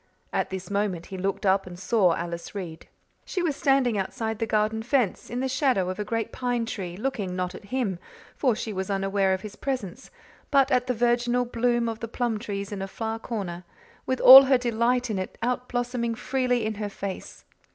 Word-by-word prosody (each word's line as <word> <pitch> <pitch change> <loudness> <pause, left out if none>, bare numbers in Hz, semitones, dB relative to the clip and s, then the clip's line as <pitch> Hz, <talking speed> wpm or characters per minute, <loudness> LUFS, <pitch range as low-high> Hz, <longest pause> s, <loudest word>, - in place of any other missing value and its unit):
At - - 0
this 190 0 -6
moment 200 -4 -1
he 190 - -7
looked 195 +2 -2
up 190 0 +3
and 175 -1 -9
saw 190 -3 +2
Alice 170 +3 -6
Reade. 170 -5 -7 0.4
She 365 - -3
was 310 -5 0
standing 270 -7 +2
outside 220 +2 -3
the 225 - -1
garden 215 +1 +1
fence, 245 -4 0
in 245 +2 -3
the 265 - 0
shadow 255 -8 +1
of 185 - -7
a - - 0
great 225 +1 -2
pine 245 -2 -1
tree, 185 -6 -5
looking 205 -6 -3
not 180 0 -2
at 200 - -11
him, 205 -5 -2 0.4
for 255 -5 +2
she 220 -1 -4
was 190 0 -3
unaware 195 0 +1
of 190 0 0
his 210 0 -8
presence, 255 -4 -4 0.4
but 275 -1 +4
at 250 -1 +2
the 250 - 0
virginal 240 +1 +2
bloom 240 0 +1
of 225 -1 -4
the 230 - -4
plum 235 -1 -1
trees 200 -2 -5
in 200 -2 -4
a 195 - -3
far 225 +3 -4
corner, 190 -7 -5 0.4
with 260 - 0
all 270 +1 +11
her 265 -1 +4
delight 245 0 +1
in 200 - -1
it 185 - -5
outblossoming 245 -1 -1
freely 250 -1 0
in 220 - -1
her 205 - -2
face. 195 -1 -7
225 Hz, 205 wpm, -26 LUFS, 195-245 Hz, 0.4 s, all